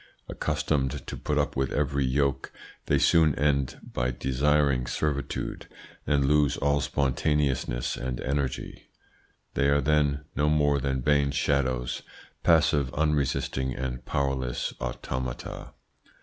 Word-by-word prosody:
Accustomed 75 Hz, -3 st, -1 dB
to -, -, -5 dB
put -, -, -2 dB
up -, -, 0 dB
with 65 Hz, 0 st, 0 dB
every 70 Hz, -1 st, 0 dB
yoke, 70 Hz, +1 st, 0 dB, 0.4 s
they -, -, +3 dB
soon 80 Hz, -4 st, +4 dB
end 70 Hz, -2 st, 0 dB
by 60 Hz, 0 st, -2 dB
desiring 65 Hz, 0 st, +1 dB
servitude, 70 Hz, +2 st, -3 dB, 0.4 s
and 70 Hz, -1 st, +2 dB
lose 75 Hz, 0 st, +3 dB
all 70 Hz, +1 st, +1 dB
spontaneousness 70 Hz, -2 st, 0 dB
and 60 Hz, -1 st, -4 dB
energy. 70 Hz, -1 st, -3 dB, 0.6 s
They 70 Hz, 0 st, +2 dB
are 70 Hz, 0 st, +4 dB
then 70 Hz, -1 st, +2 dB
no 75 Hz, +2 st, +2 dB
more 75 Hz, -2 st, +3 dB
than 65 Hz, -1 st, -1 dB
vain 70 Hz, 0 st, +3 dB
shadows, 65 Hz, -3 st, 0 dB, 0.4 s
passive, 75 Hz, -5 st, +3 dB
unresisting 70 Hz, -3 st, 0 dB
and 65 Hz, -1 st, -4 dB
powerless 65 Hz, -3 st, -1 dB
automata. 60 Hz, +1 st, -5 dB
70 Hz, 120 wpm, -27 LUFS, 65-75 Hz, 0.6 s, soon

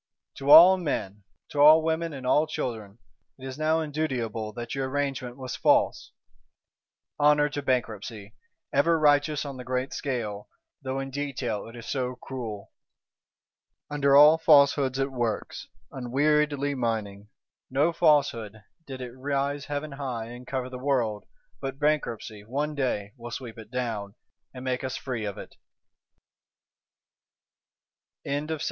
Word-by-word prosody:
To 140 Hz, +1 st, -4 dB
all 175 Hz, +5 st, +10 dB
men, 105 Hz, -, -4 dB, 0.2 s
to 145 Hz, -, -5 dB
all 155 Hz, +2 st, +8 dB
women 165 Hz, +1 st, -1 dB
and 135 Hz, -3 st, -8 dB
all 150 Hz, +4 st, +3 dB
children, 115 Hz, -9 st, -5 dB, 0.4 s
it 130 Hz, -, -11 dB
is 130 Hz, +2 st, -7 dB
now 160 Hz, +1 st, +2 dB
indutiable 125 Hz, -8 st, -3 dB
that 120 Hz, +1 st, -6 dB
your 135 Hz, 0 st, -2 dB
Arrangement 135 Hz, -3 st, -3 dB
was 130 Hz, -2 st, -5 dB
false. -, -, +2 dB, 1.1 s
Honour 150 Hz, 0 st, +4 dB
to 145 Hz, 0 st, -4 dB
Bankruptcy; 110 Hz, -5 st, -3 dB, 0.4 s
ever 165 Hz, +4 st, +3 dB
righteous 145 Hz, -1 st, +3 dB
on 140 Hz, -2 st, -6 dB
the 125 Hz, -, -7 dB
great 130 Hz, +1 st, -2 dB
scale, 110 Hz, -7 st, -4 dB, 0.3 s
though 135 Hz, 0 st, -3 dB
in 135 Hz, 0 st, -5 dB
detail 130 Hz, -7 st, -3 dB
it 115 Hz, -, -11 dB
is 120 Hz, -1 st, -9 dB
so 125 Hz, -2 st, -2 dB
cruel! 120 Hz, -6 st, -7 dB, 1.2 s
Under 140 Hz, -1 st, +3 dB
all 150 Hz, +3 st, +8 dB
Falsehoods 140 Hz, -4 st, +4 dB
it 135 Hz, 0 st, -1 dB
works, 120 Hz, -4 st, -3 dB, 0.2 s
unweariedly 145 Hz, +2 st, +1 dB
mining. 110 Hz, -5 st, -3 dB, 0.4 s
No 145 Hz, +6 st, +2 dB
Falsehood, 115 Hz, -, +2 dB, 0.2 s
did 130 Hz, -2 st, -7 dB
it 125 Hz, -1 st, -6 dB
rise 140 Hz, +2 st, -2 dB
heaven 145 Hz, +1 st, -4 dB
high 130 Hz, -5 st, -5 dB
and 125 Hz, +1 st, -11 dB
cover 130 Hz, -1 st, -3 dB
the 125 Hz, -, -7 dB
world, 120 Hz, -6 st, -1 dB, 0.3 s
but 135 Hz, 0 st, -4 dB
Bankruptcy, 125 Hz, -8 st, -1 dB
one 145 Hz, +7 st, -2 dB
day, 115 Hz, -8 st, -2 dB
will 120 Hz, 0 st, -8 dB
sweep 115 Hz, -2 st, -7 dB
it 110 Hz, -1 st, -11 dB
down, 110 Hz, -5 st, -4 dB, 0.4 s
and 130 Hz, 0 st, -9 dB
make 125 Hz, 0 st, -1 dB
us 130 Hz, -, -3 dB
free 120 Hz, -5 st, -4 dB
of 100 Hz, -2 st, -5 dB
it. -, -, -11 dB, 2.7 s
Chapter 145 Hz, +3 st, -2 dB
1.3. -, -, -10 dB
130 Hz, 140 wpm, -27 LUFS, 120-145 Hz, 2.7 s, all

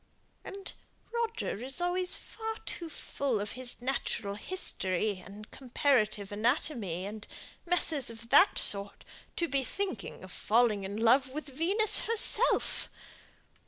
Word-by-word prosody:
"And 390 Hz, 0 st, -8 dB, 0.4 s
Roger 455 Hz, -, -3 dB
is 265 Hz, +5 st, +1 dB
always 360 Hz, +1 st, +1 dB
far 445 Hz, 0 st, -6 dB
too 335 Hz, -2 st, -6 dB
full 275 Hz, -6 st, -3 dB
of 205 Hz, 0 st, -4 dB
his 250 Hz, -1 st, -2 dB
natural 240 Hz, -5 st, -2 dB
history 205 Hz, -, -1 dB
and 205 Hz, +3 st, -13 dB
comparative 240 Hz, -6 st, 0 dB
anatomy, 215 Hz, -, -2 dB
and 210 Hz, +1 st, -8 dB, 0.4 s
messes 320 Hz, -7 st, +2 dB
of 230 Hz, 0 st, -10 dB
that 320 Hz, +9 st, +6 dB
sort, 200 Hz, 0 st, +4 dB, 0.3 s
to 340 Hz, -, -1 dB
be 275 Hz, -2 st, 0 dB
thinking 320 Hz, -, -5 dB
of 185 Hz, -, -10 dB
falling 220 Hz, -1 st, +1 dB
in 200 Hz, +2 st, -5 dB
love 250 Hz, +4 st, +3 dB
with 300 Hz, +4 st, -6 dB
Venus 375 Hz, +10 st, +3 dB
herself. 460 Hz, +1 st, +3 dB
255 Hz, 125 wpm, -30 LUFS, 210-345 Hz, 0.4 s, that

